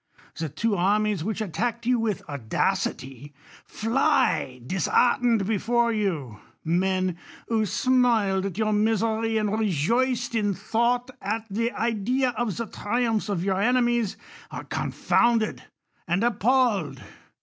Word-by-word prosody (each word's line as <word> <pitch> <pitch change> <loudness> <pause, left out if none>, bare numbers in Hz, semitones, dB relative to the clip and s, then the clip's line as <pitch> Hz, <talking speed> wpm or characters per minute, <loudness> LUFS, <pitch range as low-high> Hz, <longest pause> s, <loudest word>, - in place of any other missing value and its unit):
1 - - -26
he 165 - -4 0.2
tvso 205 - +1
armies 205 0 +1
which 220 +3 -3
attacked 230 +4 -2
you 250 0 +2
with 220 -5 -2
audacity, 135 +1 -2 0.3
fly 225 - +1
di 185 - -3
.heart 245 +10 +3
ened 230 -5 +2
before 230 +3 +1
vou. 160 - -2 0.2
Men, 185 +1 0 0.3
who 220 -2 +1
smiled 225 -5 +2
at 190 -2 -7
your 215 -1 +1
inisei 225 +1 +1
y,, - - +3
and 210 -1 0
rejoiccd'in 225 - 0
thought 240 +4 0
at 220 +3 -2
the 230 +4 0
idea 235 +3 0
of 220 -3 -2
the 230 - -2
triumphs 225 0 -1
ot 200 - 0
vour 190 +2 0
enemies, 240 -2 +1 0.3
are - - -7
confounded 230 -2 0 0.4
and 175 +5 +1
appalled. 220 - +1
215 Hz, 130 wpm, -25 LUFS, 190-235 Hz, 0.4 s, heart